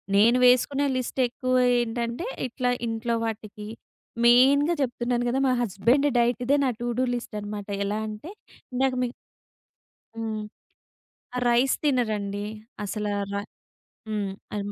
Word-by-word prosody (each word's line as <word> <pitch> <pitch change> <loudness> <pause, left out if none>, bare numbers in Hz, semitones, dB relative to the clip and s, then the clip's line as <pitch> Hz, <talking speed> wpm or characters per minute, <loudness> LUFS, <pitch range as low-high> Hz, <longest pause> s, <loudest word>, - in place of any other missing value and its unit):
నేను 230 +5 +5
వేసుకునే 270 +3 +4
లిస్ట్ 255 +1 -3
ఎక్కువ 255 +1 -3 0.2
ఏంటంటే 235 - -2 0.2
ఇట్లా 250 +1 -1 0.2
ఇంట్లో 230 +1 -1
వాటికి, 215 -1 -6 0.6
మెయిన్‍గా 275 +7 +6
చెప్తున్నాను 245 -1 0
కదా 260 - 0
మా 255 - +3
హస్బెండ్ 235 +7 +2
డైట్ 240 +1 +2
ఇదే 280 +3 +3
నా - - +2
టూ 240 - -2
డు - - +3
లిస్ట్ 240 -2 -6
అనమాట 205 0 -6 0.2
ఎలా 205 +1 -1
అంటే 215 +10 -7 0.4
ఇందాక 260 +1 +1
మీకు 245 -1 -2 1.0
హ్మ్. 220 -1 -3 1.0
ఆహ్, 250 - -1
రైస్ 245 +3 +3
తినరండి 215 -8 0 0.4
అసల 210 +1 -3 0.2
రై 200 0 -2 0.7
హ్మ్ 210 -2 -1 0.3
అ - - -1
240 Hz, 130 wpm, -26 LUFS, 215-255 Hz, 1.0 s, మెయిన్‍గా